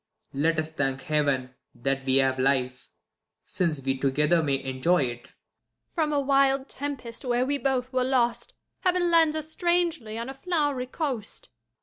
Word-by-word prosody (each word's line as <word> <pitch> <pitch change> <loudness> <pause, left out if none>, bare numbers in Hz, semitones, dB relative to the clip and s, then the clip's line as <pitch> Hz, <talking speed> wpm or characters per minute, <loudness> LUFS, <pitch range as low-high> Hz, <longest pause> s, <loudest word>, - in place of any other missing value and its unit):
Let 160 +4 +1
us 155 0 -1
thank 135 -3 -1
Heaven 140 -4 0 0.2
that 135 +2 -2
we 130 -1 +2
have 135 -1 +2
life, 130 -1 0 0.6
since 155 -7 -1
we 135 0 0
together 150 +5 +2
May 140 -3 -1
enjoy 135 +5 +1
it. 120 -1 -5
Jul. - - -21 0.6
From 315 -3 0
a 290 - +2
wild 275 0 +2
tempest, 275 -5 -6
where 245 0 +1
we 285 +1 -1
both 260 -1 -1
were 255 0 +2
lost. 240 -2 0 0.2
Heaven 360 -1 +1
lands 325 -2 +4
us 310 0 -4
strangely 340 -11 0
on 230 +1 -4
a 270 - -5
flow'ry 290 -4 -1
coast. 260 -10 -4
230 Hz, 160 wpm, -26 LUFS, -, 0.6 s, lands